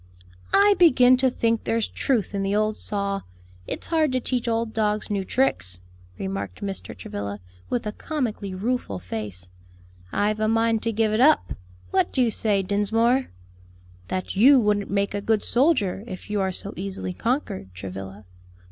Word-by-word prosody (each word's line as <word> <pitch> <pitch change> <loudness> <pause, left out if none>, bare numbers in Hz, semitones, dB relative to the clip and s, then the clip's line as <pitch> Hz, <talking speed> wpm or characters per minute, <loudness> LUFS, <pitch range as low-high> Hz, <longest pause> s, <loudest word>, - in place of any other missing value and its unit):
"I 410 +1 +6
begin 255 -7 +7
to 260 0 +3
think 230 -2 0
there's 225 -1 0
truth 240 -9 -1
in 200 - -1
the 195 +1 0
old 215 0 +1
saw, 200 -2 -2 0.5
'It's - - -3
hard 315 -4 +2
to 255 - +2
teach 245 -1 -2
old 230 -1 0
dogs 210 -1 0
new 200 -2 0
tricks,'" 95 - 0 0.4
remarked 95 - -5
Mr. 195 -2 -5
Travilla, 100 +2 -5 0.3
with 245 -2 -1
a 210 - -2
comically 220 - -3
rueful 215 - -2
face. 90 -1 -6 0.6
"I've 210 +1 0
a 215 - +1
mind 225 0 +2
to 230 - 0
give 215 0 +1
it 215 - +1
up. 305 +4 +4 0.4
What - - +2
do 255 - +3
you 235 - +1
say, 205 -3 +1
Dinsmore?" 225 +6 +2 0.8
"That 185 +1 -3
you 260 +7 +7
wouldn't 210 -3 +1
make 200 0 0
a 205 - -2
good 220 0 +1
soldier, 240 - +2
if 185 -1 -8
you 205 -1 +1
are 190 0 0
so 200 +3 -6
easily 190 -1 -4
conquered, 225 - -2
Travilla." 95 +2 -8
210 Hz, 165 wpm, -24 LUFS, 190-235 Hz, 0.8 s, begin